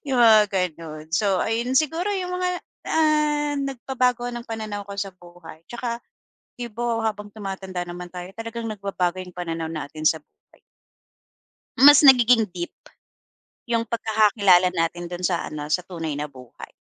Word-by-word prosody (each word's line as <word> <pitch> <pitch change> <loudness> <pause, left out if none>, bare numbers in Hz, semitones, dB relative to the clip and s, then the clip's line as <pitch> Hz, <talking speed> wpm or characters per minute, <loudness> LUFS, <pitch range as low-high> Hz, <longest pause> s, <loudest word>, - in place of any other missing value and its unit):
yung 260 - +1
mga 215 -3 +7 0.3
ganun. 155 -1 -10
So, 195 0 +2
ayun 235 +3 -1
siguro, 325 +5 0
yung 360 -1 -3
mga, 365 0 0 0.4
ah, 300 -2 +2
nagpabago 250 -2 -1
ng 240 0 -6
pananaw 215 -2 -5
ko 200 - -6
sa 195 -1 -3
buhay, 175 -2 -14
tsaka, 235 0 -4 0.6
'di 240 - -3
ba, 235 0 -1
habang 210 -1 -5
tumatanda 190 -3 -5
naman 175 0 -8
tayo 180 0 -7
talagang 230 0 -5
nagbabago 195 -3 -2
yung 180 -1 -14
pananaw 165 -2 -3
natin 155 0 -6
sa 160 - +2
buhay. - - -31 1.2
Mas 290 +1 +10
nagiging 245 -4 +6
deep 175 -1 -4 1.0
yung 230 -1 0
pagkakakilala 210 -5 +4
natin 175 0 -2
do'n 180 +1 -6
sa 175 -2 0
ano, 150 -1 -6
sa 180 - +3
tunay 165 -4 -5
na 150 +1 -3
buhay. 130 -3 -13
205 Hz, 150 wpm, -23 LUFS, 175-240 Hz, 1.2 s, Mas